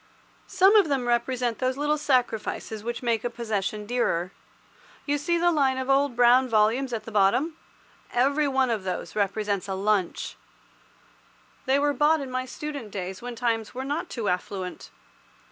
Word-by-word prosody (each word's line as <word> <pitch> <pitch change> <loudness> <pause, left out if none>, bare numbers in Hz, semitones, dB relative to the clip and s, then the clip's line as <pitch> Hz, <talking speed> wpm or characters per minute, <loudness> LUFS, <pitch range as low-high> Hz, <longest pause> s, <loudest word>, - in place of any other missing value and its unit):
Some 385 +2 +4
of 405 -5 +6
them 265 -3 0
represent 240 0 0
those 255 0 0
little 295 +1 +1
sacrifices 235 -5 -1
which 240 +2 -4
make 230 -3 0
a 240 - -1
possession 215 -3 -3
dearer. 195 -7 0 0.7
You 290 0 0
see 340 +4 0
the 345 +1 +3
line 275 -5 +2
of 260 +1 -1
old, 275 -2 +2
brown 245 +2 +5
volumes 230 +4 +2
at 230 -2 -3
the 225 - -9
bottom? 215 +11 +2 0.6
Every 280 +4 +2
one 265 -2 +1
of 215 -4 -2
those 185 +1 -4
represents 205 -1 -1
a 190 - -2
lunch. 195 -2 -1 1.3
They 265 +1 +4
were 290 0 +2
bought 305 +2 +3
in 270 -2 -6
my 255 0 -2
student 285 -4 -6
days, 190 -1 -5
when 245 0 -6
times 230 -1 -1
were 260 +1 -4
not 290 +4 -3
too 230 -4 -4
affluent. 180 0 -3
245 Hz, 165 wpm, -26 LUFS, 215-275 Hz, 1.3 s, of